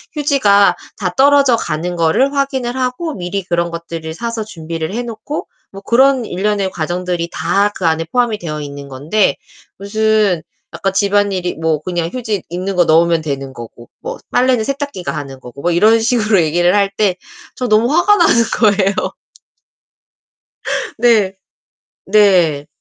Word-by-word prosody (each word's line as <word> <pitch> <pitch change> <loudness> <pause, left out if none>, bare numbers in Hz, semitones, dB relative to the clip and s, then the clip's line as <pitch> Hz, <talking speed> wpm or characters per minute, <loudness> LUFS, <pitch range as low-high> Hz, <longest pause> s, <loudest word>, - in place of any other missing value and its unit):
휴지가 205 -11 +3 0.2
다 180 -3 -2
떨어져 280 -2 +5
가는 170 +1 -3
거를 170 - +2
확인을 265 -3 -1
하고 260 +5 -2
미리 185 +1 -3
그런 170 -1 -1
것들을 165 -1 -6
사서 230 +3 -4
준비를 165 -2 -6
해놓고 240 +4 -5 0.3
뭐 195 - -9
그런 260 +3 +3
일련의 200 +1 -1
과정들이 175 +1 -3
다 200 +5 +1
그 180 - -4
안에 165 0 0
포함이 240 -4 +1
되어 150 -3 -5
있는 140 -1 -8
건데 150 +10 0 0.4
무슨 210 -4 +1 0.3
아까 195 - -2
집안일이 200 -2 0
뭐 160 -2 -1
그냥 170 -1 -2
휴지 220 -7 -3
있는 185 +2 -3
거 175 -1 +4
넣으면 165 +1 +3
되는 135 -3 -5
거고 120 -1 -11
뭐 - - -5
빨래는 250 -3 +2
세탁기가 275 - -4
하는 135 -2 -7
거고 130 +2 -11
뭐 175 - +1
이런 215 +6 +4
식으로 220 -4 +2
얘기를 175 +4 +2
할 200 -1 +2
때 200 -4 +1 0.4
저 250 - -3
너무 225 +4 +3
화가 415 +5 +4
나는 275 - +4 0.2
거예요. 200 -3 +2 1.8
네. 220 -5 +3 0.7
네. 185 -8 +3
195 Hz, 295 characters per minute, -16 LUFS, 170-230 Hz, 1.8 s, 떨어져